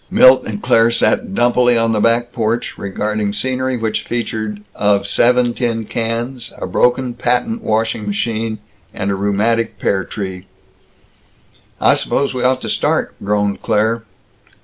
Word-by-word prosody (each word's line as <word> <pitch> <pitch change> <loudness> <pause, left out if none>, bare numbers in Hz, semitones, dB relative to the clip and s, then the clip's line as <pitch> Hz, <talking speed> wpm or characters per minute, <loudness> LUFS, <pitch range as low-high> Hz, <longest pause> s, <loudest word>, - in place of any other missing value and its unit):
Milt 130 0 +6
and 105 -1 -5
Claire 115 0 +4
sat 195 - +1
dumpily 120 0 +3
on 115 0 +2
the 110 - +1
back 115 +2 +2
porch, 115 0 -1
regarding 105 +1 -2
scenery 130 +2 -1
which 110 -2 -1
featured 110 -3 -4
of 100 -1 +1
seven 120 +3 +3
tin 115 -3 -2
cans, 115 +3 -3
a - - -4
broken 125 0 +1
patent 125 - -1
washing 110 -1 -1
machine, 110 +1 -2 0.4
and 100 - -2
a - - 0
rheumatic 105 +3 0
pear 95 -1 0
tree. 95 -1 -6 1.3
"I - - +5
suppose 140 - 0
we 125 - -3
ought 130 0 +2
to - - -5
start," - - 0
groaned 105 0 0
Claire. 110 +2 +1
115 Hz, 145 wpm, -17 LUFS, 105-120 Hz, 1.3 s, Milt